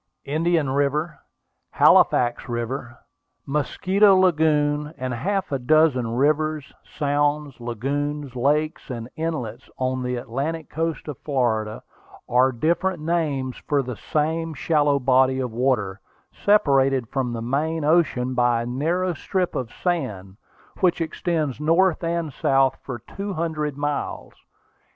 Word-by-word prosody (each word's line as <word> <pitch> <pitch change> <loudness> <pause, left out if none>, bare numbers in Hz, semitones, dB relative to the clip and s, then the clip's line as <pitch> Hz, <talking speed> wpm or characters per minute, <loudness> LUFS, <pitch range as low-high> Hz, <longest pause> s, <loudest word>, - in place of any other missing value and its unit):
Indian 160 -1 +1
River, 145 +4 0 0.5
Halifax 120 +1 +4
River, 120 +1 -4 0.5
Mosquito 190 +8 +3
Lagoon, 150 -4 +2
and 130 -1 -3
half 190 - -2
a 135 - 0
dozen 130 -2 +3
rivers, 155 +2 0
sounds, 145 -1 -1
lagoons, 140 +4 -3
lakes, 150 +6 0
and 120 -2 -5
inlets 130 -8 -4
on 130 0 -1
the 125 0 -2
Atlantic 135 +7 -4
coast 165 -1 -3
of 145 -4 -6
Florida, 110 -6 -1 0.4
are 125 +2 +3
different 170 +8 0
names 150 -5 -1
for 145 -2 +2
the 125 -2 -5
same 160 +5 -1
shallow 145 -1 +2
body 130 0 +3
of 125 -2 -2
water, 110 -6 0 0.3
separated 135 - +3
from 130 -3 -1
the 115 - -4
main 150 +6 -1
ocean 140 -6 +2
by 120 -2 +2
a - - -5
narrow 165 +9 -1
strip 180 +3 -2
of 120 -2 -4
sand, 105 - -3 0.4
which 180 -2 +2
extends 160 -4 -2
north 170 +3 +3
and 165 -3 -2
south 135 0 +2
for 125 -3 -6
two 195 - -6
hundred 155 -4 -2
miles. 145 0 -3
145 Hz, 125 wpm, -23 LUFS, 125-160 Hz, 0.5 s, Halifax